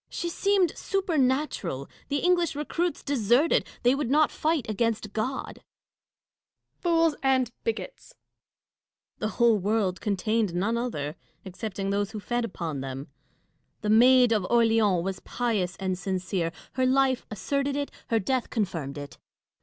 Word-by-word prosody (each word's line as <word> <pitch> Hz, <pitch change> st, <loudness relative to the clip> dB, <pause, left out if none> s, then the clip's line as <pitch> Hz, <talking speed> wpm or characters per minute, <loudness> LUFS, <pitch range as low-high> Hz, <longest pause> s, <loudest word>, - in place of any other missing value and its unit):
She 345 Hz, -, -3 dB
seemed 390 Hz, 0 st, +2 dB
supernatural: 270 Hz, -, 0 dB, 0.2 s
the 285 Hz, 0 st, 0 dB
English 350 Hz, -3 st, +2 dB
recruits 330 Hz, +4 st, -2 dB
deserted; 265 Hz, +3 st, +2 dB, 0.2 s
they 245 Hz, +1 st, +5 dB
would 275 Hz, -3 st, -1 dB
not 300 Hz, +2 st, +4 dB
fight 310 Hz, -4 st, 0 dB
against 220 Hz, -1 st, -1 dB
God. 255 Hz, +5 st, -3 dB
Catharine. -, -, -37 dB, 1.2 s
Fools 330 Hz, -3 st, +3 dB
and 260 Hz, -3 st, +2 dB
bigots! 480 Hz, +2 st, -4 dB
Dashkof. -, -, -31 dB
The 215 Hz, -, -1 dB
whole 230 Hz, -1 st, +3 dB
world 200 Hz, -2 st, 0 dB
contained 210 Hz, -1 st, 0 dB
none 205 Hz, +6 st, +1 dB
other, 160 Hz, -11 st, -3 dB, 0.3 s
except 190 Hz, +2 st, -6 dB
ing 195 Hz, 0 st, -1 dB
those 200 Hz, 0 st, 0 dB
who 215 Hz, -, -4 dB
fed 240 Hz, +3 st, -1 dB
upon 165 Hz, -10 st, -4 dB
them. 135 Hz, +1 st, -6 dB, 0.7 s
The 210 Hz, -, 0 dB
Maid 250 Hz, +2 st, +6 dB
of 215 Hz, -4 st, +2 dB
Orleans 225 Hz, -6 st, +3 dB
was 190 Hz, 0 st, -3 dB
pious 210 Hz, -7 st, -1 dB
and 190 Hz, -1 st, -1 dB
sincere: 185 Hz, -2 st, -2 dB, 0.2 s
her 260 Hz, 0 st, +1 dB
life 265 Hz, -1 st, +2 dB
asserted 280 Hz, +6 st, -1 dB
it; 285 Hz, 0 st, -2 dB, 0.2 s
her 230 Hz, -, +2 dB
death 250 Hz, +4 st, -1 dB
confirmed 165 Hz, -, -2 dB
it. 145 Hz, -1 st, -8 dB
230 Hz, 145 wpm, -27 LUFS, 195-275 Hz, 1.2 s, Maid